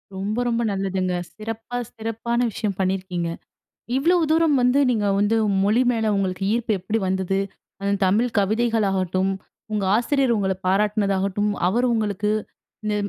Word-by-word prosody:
ரொம்ப, 205 +4 -3
ரொம்ப 235 0 +1
நல்லதுங்க. 190 -2 -1 0.2
சிறப்பா 225 +2 -5 0.2
சிறப்பான 225 +1 -2
விஷயம் 200 -2 -3
பண்ணியிருக்கீங்க, 185 -2 -1 0.7
இவ்வளோ 335 +7 +3
தூரம் 320 -3 +4
வந்து, 250 +3 +3
நீங்க 210 -4 +1
வந்து 205 +2 +2 0.3
மொழி 220 +5 +3
மேல 225 -1 0
உங்களுக்கு 190 -1 -1
ஈர்ப்பு 235 -1 0
எப்பிடி 215 +5 -1
வந்தது? 190 0 0 0.4
அது 200 0 0
தமிழ் 220 +6 +2
கவிதைகளாகட்டும், 195 -3 +1 0.4
உங்க 210 -2 0
ஆசிரியர் 255 0 +2
உங்கள 195 -2 +1
பாராட்டினதாகட்டும், 200 0 +1 0.2
அவரு 240 +6 +1
உங்களுக்கு 210 -2 0 0.5
இந்த 210 - 0
210 Hz, 130 wpm, -23 LUFS, 195-230 Hz, 0.7 s, தூரம்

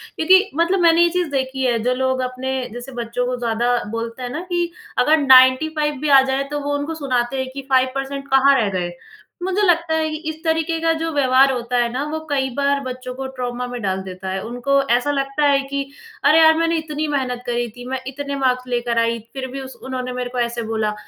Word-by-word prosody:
क्योंकि 375 +5 +4
मतलब 340 +4 +2
मैंने 335 -1 +5
ये 345 - +5
चीज़ 355 -1 -1
देखी 265 -1 -2
है 240 -2 +2
जो 250 +1 +2
लोग 260 0 0
अपने 255 +1 -3 0.2
जैसे 245 +2 -8
बच्चों 240 +2 -2
को 250 0 -1
ज़्यादा 240 +1 0 0.2
बोलते 230 +2 -5
हैं 245 - -4
ना 295 - -4
कि 345 -1 0 0.3
अगर 300 +6 +4
95 290 +2 +5
भी 300 - -1
आ 275 -1 +8
जाएँ, 265 +1 0
तो 295 0 -3
वो 290 0 -2
उनको 290 +3 -4
सुनाते 255 -4 -1
हैं 260 - -5
कि 275 - -5
5% 270 +1 0
कहाँ 270 +1 +5
रह 215 -3 +1
गए। 175 -1 -3 0.5
मुझे 380 +2 0
लगता 340 -4 +2
है 315 0 0
कि 310 - -4
इस 315 - -4
तरीके 325 0 0
का 330 0 +2
जो 325 0 -2
व्यवहार 270 -1 +4
होता 245 -1 -2
है 240 -1 +1
ना, 260 +3 -2
वो 315 - -2
कई 270 -2 0
बार 280 0 +2
बच्चों 255 -1 -6
को 265 +1 -5
ट्रॉमा 250 -1 -4
में 245 -1 -6
डाल 190 -2 -1
देता 190 0 -7
है। 190 0 -3
उनको 245 +4 0 0.2
ऐसा 290 +4 -1
लगता 275 +1 0
है 280 -1 +4
कि 275 0 -3 0.4
अरे 305 +3 +6
यार, 320 0 +7
मैंने 330 0 +1
इतनी 310 -1 -3
मेहनत 260 -4 -2
करी 240 0 -1
थी, 245 +3 -12
मैं 260 0 -3
इतने 280 +1 -5
मार्क्स 255 -2 0
लेकर 240 -1 -1
आई 230 0 +1
फिर 265 -1 -4
भी 275 - -5
उस 265 0 -9
उन्होंने 255 -1 -4
मेरे 250 0 -4
को 250 0 -4
ऐसे 235 0 -1
बोला। 220 -1 -1
265 Hz, 230 wpm, -20 LUFS, 245-295 Hz, 0.5 s, आ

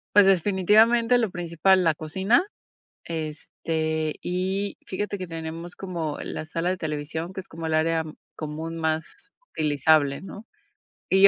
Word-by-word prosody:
Pues, 205 -1 +9
definitivamente 210 +6 +4
lo 225 -6 0
principal, 175 +2 +2
la 160 -2 +3
cocina, 190 - +2 0.6
este, 160 0 -2
y 190 +3 -1
fíjate 200 +1 -3
que 185 - -4
tenemos 165 +1 -6
como 170 -5 -4
la - - -4
sala 165 +2 -2
de 185 - 0
televisión, 160 +2 -4
que 190 - -5
es 190 - -12
como 165 0 -6
el 160 - 0
área, 160 0 +2
mm, 155 - -9 0.2
común 160 +2 -5
más 160 - -3 0.2
utilizable, 145 -1 +3
¿no? 205 +3 -9 0.6
Y 190 +1 +8
165 Hz, 145 wpm, -25 LUFS, 160-190 Hz, 0.6 s, Pues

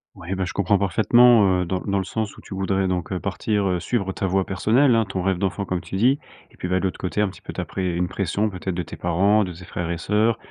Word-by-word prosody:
Oui 90 +3 -5
bah 95 0 -1
je - - -5
comprends 100 +1 +2
parfaitement, 105 0 +5
heu, - - -4
dans 95 +2 -2
dans 100 -1 -1
le 95 - 0
sens 110 +2 -4
où - - -12
tu - - -10
voudrais 95 0 0
donc 90 -1 -2
heu, 95 - -1
partir, 100 +2 -1
heu, 90 -1 0
suivre 100 -2 -1
ta 95 - -2
voie 95 +1 +1
personnelle, 120 +7 +3
hein, 115 -1 +3
ton 95 -2 -2
rêve 95 -1 0
d'enfant 100 +1 -1
comme 90 -2 -2
tu - - -7
dis. 125 +8 +3 0.3
Et - - -20
puis - - -5
ben, 90 +1 +1
de - - -6
l'autre 95 - -2
côté 95 +3 -3
un 105 - +3
petit - - -14
peu - - -7
ta - - -4
près 95 -1 -3
une 90 +1 0
pression 100 +3 -1
peut-être 90 -1 -4
de 90 - -2
tes - - -9
parents, 100 +5 +2
de 90 -2 -5
tes 90 +2 -12
frères 85 -1 -4
et 85 - -2
sœurs, 105 +6 +1
95 Hz, 285 wpm, -23 LUFS, 90-105 Hz, 0.3 s, parfaitement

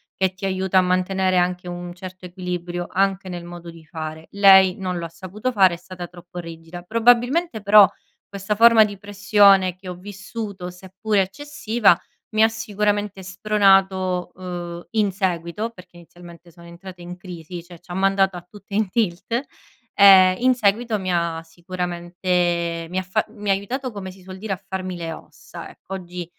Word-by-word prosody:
che 190 -1 0
ti 190 +2 -7
aiuta 190 0 0
a - - +7
mantenere 185 +1 +1
anche 180 0 0
un 175 0 -6
certo 185 +1 -10
equilibrio, 175 -1 -5
anche 195 0 0
nel 175 -2 -6
modo 175 0 -10
di 165 -1 -15
fare. 155 0 -7
Lei 190 -2 +6
non 185 -2 -3
lo 170 - -4
ha 165 - -7
saputo 185 +9 -5
fare, 190 -6 +4
è - - -5
stata 180 0 -9
troppo 175 0 -14
rigida. 165 +1 -9
Probabilmente 245 - +2
però 205 0 +8 0.4
questa 200 +1 -3
forma 225 0 +7
di 205 -2 -7
pressione 200 -2 +4
che 185 0 -10
ho 180 - -5
vissuto 195 0 -7
seppure 190 +3 -2
eccessiva 225 - +1 0.3
mi 215 0 +4
ha 220 - +7
sicuramente 210 -3 -2
spronato, 190 -2 +2
uhm, 175 -1 -7
in 210 -3 +1
seguito, 185 +3 -2
perché 180 -4 -16
inizialmente 170 0 -15
siamo 170 0 -16
entrate 180 +1 -12
in 175 +1 -8
crisi, 175 -1 -9
cioè 175 -1 -14
ci 175 - -15
ha - - -4
mandato 195 -1 +2
a 175 - -11
tutte 200 0 -14
in 215 -2 +1
tilt. 220 +3 -1 0.5
Ehm, 190 -2 +8
in 255 +1 +4
seguito 220 0 +1
mi 185 -2 -3
ha 170 -1 -1
sicuramente 175 0 -2
mi 185 - -4
ha - - -1
fa 190 +4 -1
mi 205 -1 -6
ha - - +5
aiutato 250 +7 -4
come 195 -3 -7
si 190 - -17
suol 185 +1 -10
dire 210 0 -4
"a 190 - -7
farmi 185 -1 -4
le 165 -1 -5
ossa" - - -11
ecco. 195 - -12
Oggi 180 -1 -7
185 Hz, 175 wpm, -22 LUFS, 175-200 Hz, 0.5 s, però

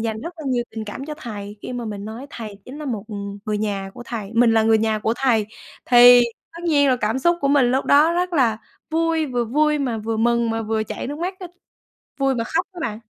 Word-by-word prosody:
dành 220 -1 -3
rất 340 - -6
là 315 - -9
nhiều 245 -2 0
tình 220 -1 -6
cảm 210 +6 -7
cho 305 - -5
thầy 205 -4 -7
khi - - -6
mà 245 -1 -4
mình 205 -2 -6
nói 225 +6 -7
thầy 215 -4 -8
chính 275 +4 -9
là 305 - -6
một, 225 -7 -3
ừm, 200 -1 -6
người 210 -1 -1
nhà 200 -2 -3
của 245 - -9
thầy 220 -4 -5
mình 230 0 +5
là 220 - +4
người 220 0 +4
nhà 220 -1 +1
của 225 +2 0
thầy. 230 -6 +2 0.4
Thì 245 0 +8 0.3
tất 335 +1 -10
nhiên 290 -4 +3
là 255 - +3
cảm 225 +2 -1
xúc 345 +5 +2
của 275 - +1
mình 270 -4 +4
lúc 265 +2 +1
đó 300 +4 +5
rất 360 +1 -1
là 235 -8 +2 0.3
vui, 325 -1 +1
vừa 245 -2 -1
vui 300 +5 +2
mà 245 -5 -1
vừa 220 +1 -3
mừng 235 +1 +2
mà 225 0 -2
vừa 220 0 -1
chảy - - -5
nước 290 +3 -5
mắt 365 +3 -3
á, 365 - -6 0.7
vui 270 -1 +2
mà 230 - -2
khóc 325 +8 -1
á 355 - -9
bạn. 220 -9 -3
240 Hz, 255 wpm, -22 LUFS, 220-285 Hz, 0.7 s, Thì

